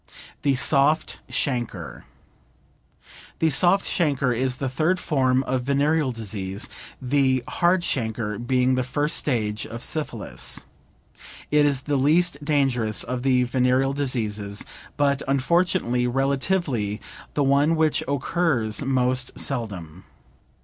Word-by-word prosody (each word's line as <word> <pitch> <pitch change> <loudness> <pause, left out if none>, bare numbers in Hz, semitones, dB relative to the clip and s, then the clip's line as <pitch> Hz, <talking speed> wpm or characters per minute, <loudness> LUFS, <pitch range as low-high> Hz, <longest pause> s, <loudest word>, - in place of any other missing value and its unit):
THE 140 -2 +2
SOFT 145 +3 +2
CHANCRE 125 -5 -3 1.3
The 160 -1 +2
soft 180 +7 +3
chancre 140 -6 +1
is 130 +1 0
the 135 +1 -3
third 160 +8 0
form 130 -5 +1
of 130 -1 -1
venereal 140 +2 +1
disease 100 -3 -5 0.3
(the 130 -1 +1
hard 175 +1 +2
chancre 110 -7 -2
being 125 +1 +1
the 130 0 +1
first 145 +4 -1
stage 110 -6 -1
of 115 +1 -7
syphilis). 155 -2 -1 0.9
It 150 0 +4
is 140 -2 0
the 145 -1 0
least 150 +2 +2
dangerous 135 -7 +1
of 125 -1 -4
the 130 -1 +3
venereal 130 +2 +1
diseases, 110 -7 -2 0.3
but 140 -1 +2
unfortunately, 135 -3 +1
relatively 135 - 0 0.4
the 145 - +2
one 140 +4 +3
which 155 -1 +2
occurs 140 -5 0
most 130 -1 0
seldom. 95 - -3
135 Hz, 115 wpm, -24 LUFS, 120-145 Hz, 1.3 s, It